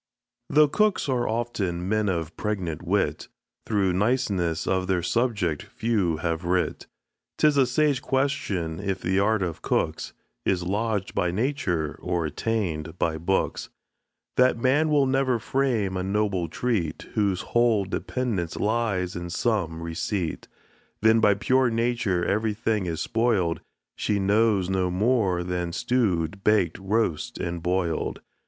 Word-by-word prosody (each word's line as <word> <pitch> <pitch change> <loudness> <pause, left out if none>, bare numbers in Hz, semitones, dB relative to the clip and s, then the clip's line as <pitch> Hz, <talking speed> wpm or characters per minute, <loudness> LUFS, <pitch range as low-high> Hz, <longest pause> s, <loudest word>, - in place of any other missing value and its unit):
Though 150 0 +5
cooks 210 +4 +1
are 125 -3 0
often 100 -7 -2
men 110 0 +1
of 85 -4 -2
pregnant 95 -7 -3
wit, 95 +3 0 0.4
Through 100 -4 +1
niceness 95 -6 0
of 95 -1 0
their 90 -2 +1
subject 100 - 0
few 100 -8 -1
have 85 +1 -2
writ. 90 +1 -1 0.5
'Tis 150 -1 +4
a 135 -2 +4
sage 140 0 +2
question, 105 - -1
if 95 -1 -2
the 95 +2 +1
art 105 0 +2
of 85 -3 -4
cooks - - -1 0.3
Is 90 +3 +1
lodg'd 105 +1 -1
by 90 - +1
nature 95 - -1
or 90 -2 -1
attain'd 80 -2 -2
by 80 -2 0
books? 95 +4 -1 0.7
That 125 -1 +4
man 135 +6 +2
will 145 -2 +4
never 130 -2 +2
frame 115 -5 0
a 90 - -1
noble 95 -2 0
treat, 85 -4 -2
Whose 100 -4 +1
whole 120 -4 +2
dependence 100 -3 -2
lies 105 -5 0
in 85 0 -5
some 85 -5 -1
receipt. 85 +1 -3 0.6
Then 110 +1 +6
by 105 -2 +4
pure 130 +5 +2
nature 115 -6 0
everything 110 -1 0
is 80 -2 -3
spoil'd, 110 -8 +1 0.3
She 105 - 0
knows 100 -1 +2
no 95 -1 0
more 95 -2 +1
than 90 -1 -2
stew'd, 100 -5 0
bak'd, 105 -6 +2
roast, 110 +2 -1
and 85 -1 -3
boil'd. 90 -1 -1
100 Hz, 135 wpm, -25 LUFS, 90-115 Hz, 0.7 s, Then